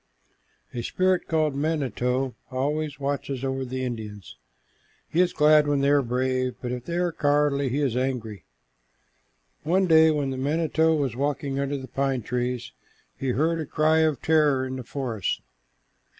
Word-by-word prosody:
A 120 Hz, -, -3 dB
spirit 185 Hz, +8 st, +1 dB
called 155 Hz, -3 st, +1 dB
the -, -, -6 dB
manito 135 Hz, -4 st, -1 dB, 0.2 s
always 145 Hz, +2 st, -2 dB
watches 140 Hz, -1 st, -3 dB
over 135 Hz, 0 st, -1 dB
the 130 Hz, 0 st, -4 dB
Indians. 105 Hz, -6 st, -7 dB, 0.7 s
He 170 Hz, -, +2 dB
is 180 Hz, -1 st, +2 dB
glad 150 Hz, 0 st, +5 dB
when 145 Hz, -1 st, +1 dB
they 140 Hz, -, +3 dB
are 145 Hz, -1 st, +5 dB
brave, 130 Hz, 0 st, -1 dB
but 125 Hz, -, -4 dB
if 125 Hz, -1 st, -5 dB
they 170 Hz, -, -4 dB
are 175 Hz, -1 st, +1 dB
cowardly, 145 Hz, -2 st, +1 dB
he 140 Hz, +4 st, -1 dB
is 130 Hz, -5 st, 0 dB
angry. 120 Hz, -, -2 dB, 1.2 s
One 185 Hz, +5 st, +2 dB
day 160 Hz, -2 st, +6 dB
when 145 Hz, -3 st, 0 dB
the 130 Hz, -, -4 dB
manito 160 Hz, +3 st, +1 dB
was 135 Hz, -6 st, -1 dB
walking 140 Hz, 0 st, -2 dB
under 140 Hz, +1 st, -1 dB
the 130 Hz, -1 st, -8 dB
pine 135 Hz, -1 st, -1 dB
trees, 125 Hz, 0 st, -2 dB, 0.4 s
he 135 Hz, -, -3 dB
heard 160 Hz, +6 st, +1 dB
a 155 Hz, -, -3 dB
cry 155 Hz, +1 st, +2 dB
of 155 Hz, -5 st, +1 dB
terror 150 Hz, -4 st, +3 dB
in 130 Hz, 0 st, -4 dB
the 130 Hz, -, -6 dB
forest. 120 Hz, -6 st, -3 dB
140 Hz, 165 wpm, -25 LUFS, 130-155 Hz, 1.2 s, day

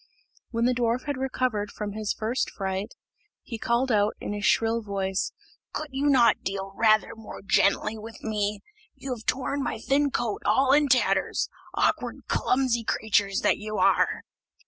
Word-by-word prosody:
When 230 Hz, 0 st, 0 dB
the 250 Hz, -, +3 dB
dwarf 240 Hz, 0 st, 0 dB
had 285 Hz, -2 st, -3 dB
recovered 255 Hz, -5 st, -1 dB
from 210 Hz, -1 st, -5 dB
his 215 Hz, 0 st, -2 dB
first 225 Hz, +4 st, -1 dB
fright, 195 Hz, +2 st, -4 dB, 0.5 s
he 230 Hz, -3 st, -7 dB
called 240 Hz, +3 st, +1 dB
out, 210 Hz, -1 st, +2 dB
in -, -, -4 dB
his 205 Hz, 0 st, -5 dB
shrill 230 Hz, +1 st, +2 dB
voice: 195 Hz, -2 st, -2 dB, 0.4 s
"Could 305 Hz, -2 st, -4 dB
not 270 Hz, -3 st, +4 dB
you -, -, -41 dB
deal 195 Hz, 0 st, -4 dB
rather 215 Hz, -1 st, +3 dB
more 220 Hz, -2 st, -10 dB
gently 215 Hz, +2 st, +2 dB
with 225 Hz, +1 st, -10 dB
me? 210 Hz, -1 st, -2 dB, 0.3 s
You 265 Hz, -1 st, -5 dB
have 220 Hz, -3 st, -10 dB
torn 275 Hz, +2 st, 0 dB
my 245 Hz, -, -2 dB
thin 280 Hz, +5 st, +1 dB
coat 240 Hz, -5 st, -2 dB
all 265 Hz, +6 st, +3 dB
in 295 Hz, 0 st, +4 dB
tatters, 260 Hz, -1 st, +2 dB, 0.3 s
awkward, -, -, 0 dB
clumsy 250 Hz, -3 st, +1 dB
creatures 205 Hz, -3 st, +1 dB
that -, -, +2 dB
you 215 Hz, 0 st, -4 dB
are!" -, -, +2 dB
225 Hz, 165 wpm, -26 LUFS, 205-255 Hz, 0.5 s, not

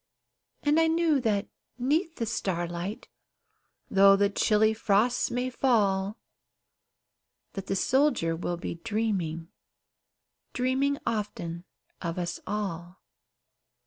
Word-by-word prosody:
And 295 Hz, +2 st, +3 dB
I 325 Hz, -, +4 dB
knew 325 Hz, -3 st, +2 dB
that 210 Hz, -4 st, 0 dB, 0.3 s
'neath 315 Hz, +7 st, 0 dB
the 230 Hz, -, -2 dB
starlight, 175 Hz, -2 st, -3 dB, 0.8 s
Though 195 Hz, 0 st, +7 dB
the 200 Hz, +1 st, +2 dB
chilly 215 Hz, +2 st, +3 dB
frosts 220 Hz, +3 st, +2 dB
may 250 Hz, +1 st, -2 dB
fall, 210 Hz, -5 st, +1 dB, 1.4 s
That 195 Hz, -1 st, -6 dB
the 195 Hz, -, 0 dB
soldier 260 Hz, -, +2 dB
will 175 Hz, +1 st, -3 dB
be -, -, -4 dB
dreaming, 190 Hz, -7 st, -2 dB, 1.0 s
Dreaming 265 Hz, +3 st, +1 dB
often 185 Hz, -6 st, -3 dB, 0.4 s
of 170 Hz, -1 st, -3 dB
us 175 Hz, -1 st, -3 dB
all. 185 Hz, -3 st, -4 dB
210 Hz, 105 wpm, -28 LUFS, 180-250 Hz, 1.4 s, Though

